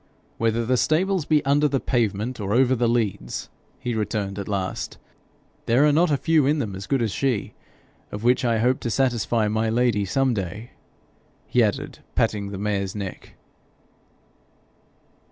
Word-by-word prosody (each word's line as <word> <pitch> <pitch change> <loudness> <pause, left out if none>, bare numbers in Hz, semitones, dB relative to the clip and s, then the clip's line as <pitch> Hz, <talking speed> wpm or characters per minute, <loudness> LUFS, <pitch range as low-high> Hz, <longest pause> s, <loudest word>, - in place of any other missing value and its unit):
'Whether 115 0 +1
the 125 +2 +2
stables 180 +4 +1
be 150 -2 +2
under 145 +2 +3
the 135 -2 0
pavement 115 0 -1
or 100 0 -2
over 130 +1 +4
the 120 -1 +1
leads,' 110 - -2 0.3
he 120 - -3
returned 105 -2 -2
at 100 - -5
last, 95 -3 -3 0.7
'there 125 +5 +4
are 150 - +5
not 165 +4 +3
a 145 - +2
few 150 +1 +2
in 150 +2 +2
them 110 -9 -3
as 95 +1 -7
good 135 -4 +1
as 110 - -1
she 125 -5 -1 0.6
of 105 - -6
which 125 +2 +3
I 115 -2 +2
hope 125 +4 +2
to 120 - -3
satisfy 115 -2 +1
my 110 +1 0
Lady 115 -3 +2
some 130 +7 +1
day,' 100 +3 -5 0.7
he - - +2
added, - - -1 0.2
patting 100 -2 0
the 100 - -6
mare's 100 -1 -2
neck. 100 -3 -7
115 Hz, 165 wpm, -24 LUFS, 105-135 Hz, 0.7 s, are